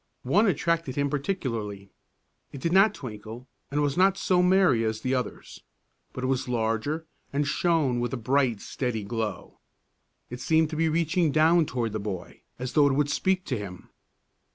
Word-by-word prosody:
One 200 - +3
attracted 165 -5 0
him 140 -1 0
particularly. 115 - -3 0.6
It 140 - -8
did 165 +5 -1
not 195 +3 +5
twinkle 115 0 -8 0.2
and 145 +1 0
was 145 -1 0
not 190 +1 +4
so 180 -1 +2
merry 180 -10 +4
as 110 0 -2
the 130 +2 -1
others, 125 -1 -4 0.5
but 130 - -6
it - - +1
was 130 -1 -1
larger 115 +7 -1 0.3
and 145 +1 0
shone 155 -6 +1
with 120 -1 -2
a 130 - -2
bright, 125 -2 +1
steady 120 -5 -3
glow. 110 0 -4 0.7
It 125 - -6
seemed 160 +1 +2
to - - -3
be 160 +1 +2
reaching 165 0 +1
down 160 +2 +4
toward 120 -3 -2
the 110 - -3
boy 100 -4 -6 0.2
as 125 0 -5
though 145 -2 +5
it 140 - +2
would 145 0 +1
speak 190 +4 0
to 130 - -2
him. 90 -3 -9
135 Hz, 175 wpm, -27 LUFS, 115-160 Hz, 0.7 s, not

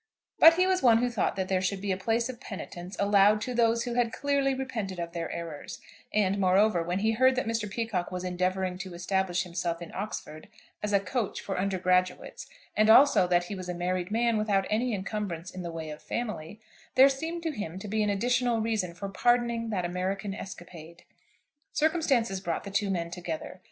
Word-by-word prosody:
But 330 +1 +9
he 365 +1 +3
was 375 0 +2
one 235 -3 +6
who 245 +1 0
thought 220 -5 0
that 190 -1 -2
there 185 -1 +1
should 190 +1 -1
be 200 0 -2
a - - +1
place 225 +5 0
of 255 -2 -7
penitence 185 -4 -8
allowed 205 +1 +5
to 250 - -3
those 230 -1 +2
who 245 - -3
had 240 -1 +1
clearly 280 0 +1
repented 225 -8 -4
of 170 -1 -4
their 170 -1 -4
errors; 165 -3 -6 0.3
and, 200 -1 +1
moreover, 190 0 +3
when 175 +2 -2
he 220 +1 +2
heard 260 +3 +4
that 255 - -1
Mr. 225 -2 -2
Peacocke 210 -4 -2
was 180 0 -4
endeavouring 185 0 -1
to 185 -2 -7
establish 185 0 0
himself 170 -1 -3
in 170 - -9
Oxford 185 -6 -6 0.3
as 210 - -2
a 200 - +4
"coach" 220 +1 -2
for 195 - -4
undergraduates, 185 -1 0 0.3
and 215 +1 +4
also 240 -5 +7
that 175 0 +3
he 175 - -6
was 185 -2 -6
a 180 - -3
married 180 +1 -2
man 230 0 +1
without 200 -2 +1
any 240 +4 +1
encumbrance 190 -3 -4
in 185 - -7
the 170 - -5
way 160 -2 -6
of 150 - -9
family, 215 -5 -5 0.4
there 265 +1 +8
seemed 320 +5 -3
to 325 - -1
him 205 - -5
to 195 - -7
be 215 +2 0
an 210 - +1
additional 240 +3 +1
reason 215 -6 -1
for 200 +3 -5
pardoning 235 +2 +1
that 185 -5 -1
American 190 +3 -2
escapade. 175 -4 -10 0.7
Circumstances 275 - +1
brought 170 -3 -2
the 200 - -7
two 200 0 0
men 170 -3 -2
together. 175 0 -6
200 Hz, 200 wpm, -28 LUFS, 180-230 Hz, 0.7 s, But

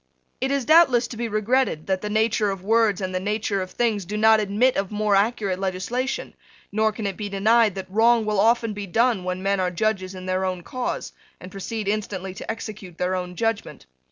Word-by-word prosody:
It 265 - -1
is 275 -2 0
doubtless 285 -7 +5
to - - -7
be 235 +1 -3
regretted 215 -5 0
that 190 -1 -1
the 210 - -4
nature 220 0 +1
of 195 -2 -5
words 220 -1 +2
and 185 -1 -3
the 185 - 0
nature 205 0 -1
of 185 - -5
things 220 -3 0
do 205 +4 -5
not 220 0 +5
admit 215 +5 +2
of 195 -1 -1
more 210 -1 +1
accurate 200 -2 +1
legislation: 195 +8 -2 0.4
nor 220 +1 +2
can 215 0 -6
it 195 -2 -2
be 205 +1 -5
denied 215 +1 +3
that 190 -1 -5
wrong 225 +3 +3
will 210 -2 0
often 230 0 +3
be 205 -1 -6
done 225 +1 +2
when 185 +1 -3
men 195 0 +1
are 185 -1 +1
judges 190 0 -1
in 185 0 -8
their 185 0 -1
own 185 -2 -2
cause, 255 +6 -4 0.3
and 185 - -10
proceed 200 +2 -5
instantly 200 -3 -3
to - - -9
execute 210 -6 -6
their 180 +1 0
own 180 -1 -4
judgment. 225 - -2
210 Hz, 215 wpm, -23 LUFS, 190-225 Hz, 0.4 s, doubtless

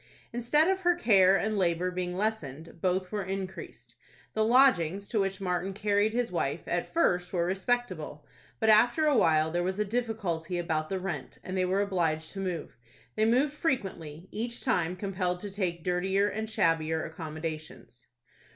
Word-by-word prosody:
Instead 245 +7 +3
of 380 0 +2
her 350 -2 +3
care 195 - +5
and 215 0 -1
labor 180 0 +1
being 180 0 -3
lessened, 165 -7 -3
both 185 0 0
were 210 -1 -1
increased. 190 -10 -6 0.4
The 220 - +2
lodgings 200 - +4
to 220 - 0
which 195 0 -1
Martin 180 0 -2
carried 205 +1 +1
his 240 +1 -1
wife, - - -1
at - - -2
first, 180 - +1
were 170 -2 +1
respectable, 185 -6 -2 0.3
but 220 - +1
after 240 +8 +4
a 295 -2 +4
while 160 -7 +3
there 175 +1 0
was 185 +2 -2
a 210 - +1
difficulty 200 -7 -2
about 160 -2 -1
the 190 - -2
rent, 185 -1 -5
and 185 - -5
they 185 -1 +2
were 190 +2 +1
obliged 165 -5 -1
to 195 - -7
move. 180 -9 -4 0.4
They 215 - +2
moved 260 +6 +3
frequently, 190 - -3
each 235 +2 -4
time 180 -9 +1
compelled 185 -2 -2
to 205 - -6
take 180 -4 -2
dirtier 190 +3 +1
and 220 +1 -3
shabbier 160 -5 +1
accommodations. 155 -5 -7
190 Hz, 170 wpm, -29 LUFS, 170-215 Hz, 0.4 s, care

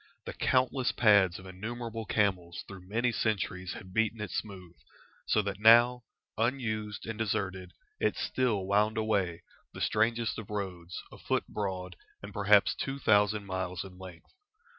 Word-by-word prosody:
The - - -5
countless 130 0 +1
pads 100 -6 +4
of 95 - -12
innumerable 115 +4 -5
camels 95 -6 0
through 95 -2 -11
many 120 +3 +1
centuries 95 -5 -1
had 95 -1 -10
beaten 110 +1 +1
it 105 -3 -5
smooth, 95 -5 -6 0.5
so 110 - +3
that 100 -1 -4
now, 120 +2 +6 0.3
unused 110 -4 -1
and 110 0 -5
deserted, 95 -4 -2 0.3
it - - +1
still 115 -7 0
wound 105 +3 +2
away, 100 -6 0 0.3
the - - -7
strangest 115 +1 +1
of 110 - -9
roads, 90 -4 -5
a - - -12
foot - - 0
broad, 90 -3 -4 0.3
and 100 0 -8
perhaps 100 0 +4
two 135 +1 -4
thousand 105 -4 +3
miles 95 -2 -3
in 95 -1 -12
length. 90 -3 -12
105 Hz, 150 wpm, -30 LUFS, 95-110 Hz, 0.5 s, now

